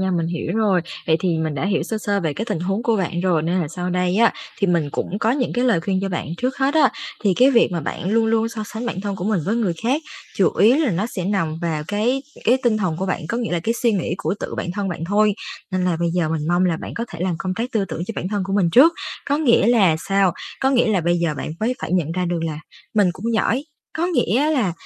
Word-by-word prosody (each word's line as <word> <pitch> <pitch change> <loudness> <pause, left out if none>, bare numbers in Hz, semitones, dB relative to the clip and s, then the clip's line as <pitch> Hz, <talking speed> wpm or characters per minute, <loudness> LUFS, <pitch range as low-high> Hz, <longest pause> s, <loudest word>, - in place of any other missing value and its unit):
nha, 190 0 0
mình 170 -2 0
hiểu 170 -1 -3
rồi. 205 -5 +3 0.3
Vậy 160 - +4
thì 170 -3 +1
mình 160 -2 -1
đã 135 - -2
hiểu 195 - +1
sơ 220 +6 -3
sơ 200 -1 0
về 160 -4 -1
cái 205 +10 -3
tình 210 -8 -3
huống 195 +5 -1
của 230 -2 +2
bạn 175 -3 -1
rồi 175 -4 +2
nên 175 +3 0
là 160 - -2
sau 180 +3 -4
đây 180 +1 +1
á 230 +1 +5 0.3
thì 200 - +2
mình 170 -5 +1
cũng 195 +7 -3
có 220 +1 +2
những 255 0 0
cái 245 - 0
lời 230 -10 +3
khuyên 190 +2 -1
cho 195 - -1
bạn. 175 -5 -3
Trước 255 +7 -2
hết 275 +2 +1
á, 305 -4 +5 0.3
thì 195 -3 +3
cái 255 +8 +5
việc 235 -7 +4
mà 170 - -1
bạn 175 +5 -4
luôn 225 +1 +3
luôn 225 0 +2
so 225 -1 -5
sánh 225 +4 -5
bản 190 -5 -3
thân 200 -1 -3
của 180 - -5
mình 210 -3 +1
với 210 +4 0
người 215 -7 +1
khác 265 +7 +1 0.3
chủ 190 - +4
yếu 230 +6 +6
là 305 -5 +2
nó 190 +4 0
sẽ 190 -6 -5
nằm 180 -5 -1
vào 160 -3 -1
cái 235 +6 0 0.2
cái 250 +3 +4
tinh 235 -3 +3
thần 185 -7 -1
của 190 +3 -2
bạn, 185 - -1
có 235 - -1
nghĩa 230 -6 -2
là 175 - 0
cái 225 +8 -1
suy 235 -2 +4
nghĩ 180 -4 -1
của - - -1
tự - - -4
bạn 175 - -3
thân 200 -1 -2
bạn 165 -2 -4
thôi, 205 +3 +3 0.4
nên 185 -1 0
là 180 -2 +1
bây 170 -1 +1
giờ 170 -2 0
mình 155 -1 -2
mong 175 +1 +3
là 175 -3 +1
bạn - - -7
có 230 - -2
thể 170 - -9
làm 180 -1 0
công 185 0 -2
tác 235 +6 -3
tư 215 -4 +1
tưởng 170 - -5
cho 225 - -4
bản 180 - -2
thân 205 -1 -1
của 195 - -4
mình 190 -4 +2
trước. 280 - +7 0.3
Có 285 - +2
nghĩa 245 -9 +4
là 205 -9 +4
sao? 195 -2 +3 0.3
Có 265 - +3
nghĩa 250 -3 +3
là 210 -4 +2
bây 175 +1 +1
giờ 170 -3 0
bạn 145 - -4
mới 235 +4 +1
phải - - -4
nhận 165 -4 +1
ra 180 +1 -1
được 170 -1 -1
là 155 -2 -3 0.4
mình 205 -3 +4
cũng 230 +6 -3
giỏi. 245 +5 +1 0.3
Có 330 +2 +1
nghĩa 300 - +2
là 245 - +1
195 Hz, 290 wpm, -21 LUFS, 175-230 Hz, 0.4 s, trước